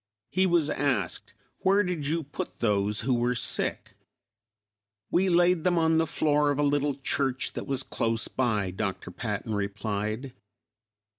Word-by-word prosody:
He 190 +1 +3
was 170 -4 +2
asked, 140 -2 -1 0.3
"Where 200 +2 +3
did 175 -6 -2
you 165 +2 0
put 145 - -6
those 105 -2 +1
who 130 +3 +1
were 120 +1 +1
sick?" - - -1 1.2
"We 185 +2 +3
laid 175 -1 +4
them 180 -1 +2
on 160 -1 +3
the 165 - +1
floor 150 -1 +2
of 145 - 0
a 145 - +2
little 145 -1 +1
church 135 -1 -1
that - - -5
was 135 -1 0
close 115 -2 -1
by," 105 -7 0
Dr. 95 -1 -4
Patton 105 +3 -4
replied. 105 +4 -3
135 Hz, 150 wpm, -27 LUFS, 110-160 Hz, 1.2 s, laid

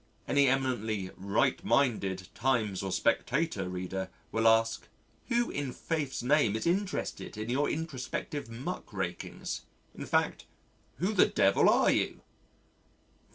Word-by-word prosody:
Any 140 -1 +4
eminently 110 -7 0
"right 115 - +1
minded" 100 - +1
Times 110 -6 0
or 95 -1 -3
Spectator 125 - 0
reader 95 +1 -4 0.2
will 115 0 +2
ask: 115 0 +3 0.4
"Who 240 -1 +1
in 140 -3 -3
Faith's 145 -4 -3
name 125 -5 +3
is 110 - -2
interested 185 - -1
in 110 +2 -3
your 140 +3 +1
introspective 145 -2 -4
muck 115 +3 -6
rakings - - -4 0.3
in - - -7
fact, - - +1 0.5
who 190 +6 0
the - - +5
Devil - - +4
are - - +5
you?" - - 0
125 Hz, 125 wpm, -30 LUFS, 105-145 Hz, 0.5 s, the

